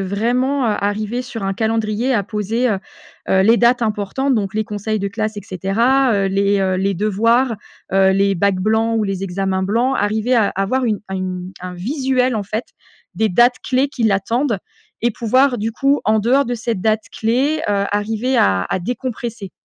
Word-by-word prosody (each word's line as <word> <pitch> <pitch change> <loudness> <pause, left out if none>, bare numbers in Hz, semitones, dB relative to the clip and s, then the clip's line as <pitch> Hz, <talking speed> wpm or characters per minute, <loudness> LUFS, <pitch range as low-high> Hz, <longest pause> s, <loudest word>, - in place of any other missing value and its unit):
vraiment, 245 +8 0
heu, 215 -3 +1
arriver 215 +4 -2
sur 230 -5 -6
un 195 - -1
calendrier 225 +3 0
à 205 -4 +2
poser, 225 +5 -1
heu 205 - 0 0.5
heu, 190 - +3
les 225 +4 +5
dates 240 +1 +3
importantes 220 +6 0
donc 200 -3 -1
les 215 0 -1
conseils 215 0 -3
de 200 - -2
classe 215 0 -3
et 205 - -6
cetera, 230 +8 +1
heu, 195 -1 +1
les, 200 +1 +1
heu, 190 -1 +1
les 195 +1 0
devoirs, 230 +6 +2 0.4
heu, 190 0 +4
les 195 +1 +2
bacs 195 +1 +1
blancs 220 +2 +1
ou 215 - +1
les 195 -1 -3
examens 190 0 -1
blancs, 235 +7 +1
arriver 220 +4 +1
à 220 -4 +3
avoir 225 +7 -1
une 215 -4 0
à 190 - -4
une 185 -1 -4
un 180 0 -6
visuel, 255 - 0
en 210 - -1
fait, 215 +4 -4 0.5
des 220 - +1
dates 240 +6 +4
clés 260 +2 +1
qui 265 -3 -5
l'attendent 220 +3 +1 0.4
et 240 - +3
pouvoir 255 +3 +2
du 220 +2 -1
coup 275 +5 +1
en 215 +1 +3
dehors 260 +6 +3
de 245 - -2
ces 235 0 -2
dates 215 +2 0
clés, 260 +8 +1
heu, 200 -1 +1
arriver 220 +5 -1
à 95 - +3
à - - 0
décompresser. 235 -2 -5
220 Hz, 190 wpm, -19 LUFS, 195-245 Hz, 0.5 s, les